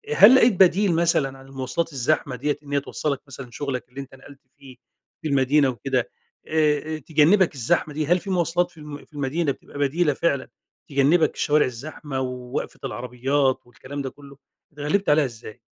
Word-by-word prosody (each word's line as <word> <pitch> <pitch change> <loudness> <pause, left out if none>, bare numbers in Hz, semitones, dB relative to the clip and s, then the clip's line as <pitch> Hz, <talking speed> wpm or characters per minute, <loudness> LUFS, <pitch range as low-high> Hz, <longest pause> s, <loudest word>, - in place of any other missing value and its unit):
هل 235 +5 +9
لقيت 245 -3 +5
بديل 190 0 +5
مثلًا 155 -5 +1
عن 135 - -15
المواصلات 135 +5 -3
الزحمة 135 +1 0
دِيِّة 145 +4 -1
إن 145 0 -8
هي 140 - +3
توصلك 140 0 -3
مثلًا 135 -2 -9
شغلك 130 -1 -4
اللي 135 +3 -7
أنتَ 135 -1 -12
نقلت 135 +1 -15 0.2
فيه 135 -2 -14 0.5
في - - -3
المدينة 140 0 +3
وكدا؟ 130 +2 -1 0.4
آآ، 155 0 +1
آآ - - -4
تجنبك 160 +6 +3
الزحمة 150 +4 0
دي؟ 155 +1 -1
هل 175 +3 +3
في 195 - -9
مواصلات 175 -1 +1
في - - -23
الم 150 -1 -9
في - - -35
المدينة 145 +2 -1
بتبقى 140 - -11
بديلة 145 +2 +2
فعلًا، 140 -2 -1 0.4
تجنبك 145 +4 +3
الشوارع 150 0 +2
الزحمة 135 +2 -6
ووقفة 125 0 -5
العربيات 130 +2 0
والكلام 135 +3 -8
ده 135 - -4
كله؟ 140 0 -15 0.4
أتغلبت 150 +7 -1
عليها 150 0 +4
إزاي؟ 115 -2 -10
145 Hz, 175 wpm, -23 LUFS, 135-155 Hz, 0.5 s, هل